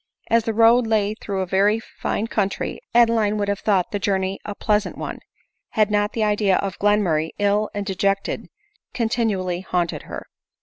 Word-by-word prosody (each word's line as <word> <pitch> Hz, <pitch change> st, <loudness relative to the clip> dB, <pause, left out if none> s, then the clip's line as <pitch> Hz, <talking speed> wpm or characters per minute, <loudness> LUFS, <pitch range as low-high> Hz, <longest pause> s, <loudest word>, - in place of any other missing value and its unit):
As 230 Hz, -1 st, +4 dB
the 225 Hz, -, -1 dB
road 230 Hz, +1 st, +5 dB
lay 215 Hz, -2 st, +1 dB
through 200 Hz, -3 st, -4 dB
a -, -, -1 dB
very 200 Hz, +4 st, +2 dB
fine 220 Hz, -1 st, -3 dB
country, 200 Hz, -4 st, -2 dB, 0.2 s
Adeline' 225 Hz, -3 st, +4 dB
would 205 Hz, -1 st, -1 dB
have 200 Hz, -1 st, -1 dB
thought 195 Hz, -4 st, +1 dB
the 205 Hz, -, -2 dB
journey 190 Hz, 0 st, -1 dB
a 205 Hz, -, -6 dB
plea 210 Hz, 0 st, +2 dB
sant 210 Hz, -, -8 dB
one, -, -, -5 dB, 0.5 s
had 215 Hz, -1 st, +2 dB
not 205 Hz, 0 st, +1 dB
the 225 Hz, -, 0 dB
idea 205 Hz, -2 st, +2 dB
of 195 Hz, -2 st, -3 dB
Glenmurray, 190 Hz, -7 st, +2 dB
ill 205 Hz, +1 st, +1 dB
and 205 Hz, 0 st, -2 dB
deject 195 Hz, 0 st, 0 dB
ed, -, -, -4 dB, 0.5 s
continually 215 Hz, -7 st, 0 dB
haunted 175 Hz, -3 st, -1 dB
her. -, -, -6 dB
205 Hz, 180 wpm, -22 LUFS, 195-220 Hz, 0.5 s, road